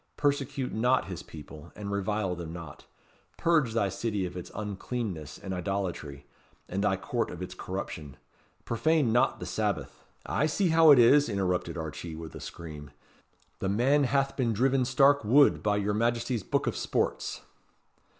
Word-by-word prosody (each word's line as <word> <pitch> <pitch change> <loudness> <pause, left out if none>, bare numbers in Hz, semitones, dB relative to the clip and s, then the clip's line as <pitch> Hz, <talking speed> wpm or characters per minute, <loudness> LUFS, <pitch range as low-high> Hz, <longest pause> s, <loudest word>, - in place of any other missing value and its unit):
Persecute 140 -2 -1
not 125 +4 +2
His 90 -4 -6
people, 75 +1 -11
and 100 -1 -5
revile 100 -1 -1
them 85 -2 -6
not. 85 -4 -9 0.5
Purge 155 -9 +2
thy 105 -4 +1
City 105 -2 -2
of 90 0 -6
its 90 - -7
uncleanness 105 - -4
and 95 - -6
idolatry, 90 -7 -3 0.4
and 100 +2 -2
thy 95 -2 +2
Court 115 +5 -2
of 85 - -8
its 90 - -7
corruption. 85 -7 -6 0.5
Profane 145 +1 +2
not 120 - +2
the - - -5
Sabbath" - - -2 0.2
"I 150 - +1
see 175 +4 +1
how 160 0 +6
it 145 - +9
is," 135 +4 +6
interrupted 95 -3 -1
Archee 80 +1 -6
with 80 -1 -8
a - - -8
scream; 75 -3 -8 0.7
"the 95 - -1
man 135 +8 +3
hath 135 +1 +1
been 120 -4 +1
driven 130 +3 +2
stark 135 +2 +4
wud 135 +7 +5
by 105 -1 +1
your 105 0 0
Majesty's 115 +1 0
Book - - -1
of - - -1
Sports." - - -1
105 Hz, 160 wpm, -29 LUFS, 90-130 Hz, 0.7 s, it